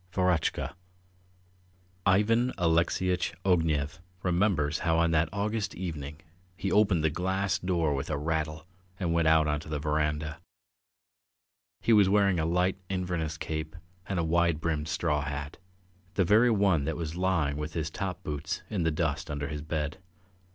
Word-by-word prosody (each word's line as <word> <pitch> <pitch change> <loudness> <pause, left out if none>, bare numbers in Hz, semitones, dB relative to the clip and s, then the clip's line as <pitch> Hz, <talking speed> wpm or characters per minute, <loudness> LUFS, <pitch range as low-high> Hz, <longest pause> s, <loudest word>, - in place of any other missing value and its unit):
VEROTCHKA 90 -2 +1 1.3
IVAN 115 +6 +3
ALEXEYITCH 90 +2 +1
OGNEV 80 -5 +1 0.2
remembers 85 -5 +1
how 80 -1 +1
on 85 0 +3
that 80 0 +2
August 105 +1 -2
evening 75 -5 -5 0.4
he 95 - -2
opened 100 -6 +3
the 80 - +2
glass 95 +3 0
door 85 -5 +1
with 70 +1 -3
a 75 - -1
rattle 80 +1 -2 0.3
and 85 -4 0
went 85 -1 +2
out 80 -1 +5
on 75 0 0
to 75 - -10
the 75 - -1
verandah. 75 +1 -1 1.4
He 115 - +3
was 100 -3 +6
wearing 100 -3 +3
a 80 - 0
light 90 +2 +1
Inverness 90 -4 -2
cape 80 -1 -4 0.3
and 95 - -2
a 85 - +1
wide 85 -1 +2
brimmed 80 -2 -1
straw 75 -2 0
hat, 75 +1 -5 0.6
the 95 - +3
very 110 +7 +5
one 100 -9 +3
that 80 0 -2
was 80 -1 -4
lying 85 -6 +1
with 75 +1 -4
his 80 -2 -2
top 95 0 -4
boots 75 -1 -4
in 100 -4 -1
the 80 - +2
dust 80 +1 -1
under 70 -1 -3
his 75 0 -4
bed. 75 +2 -3
80 Hz, 160 wpm, -29 LUFS, 75-95 Hz, 1.4 s, was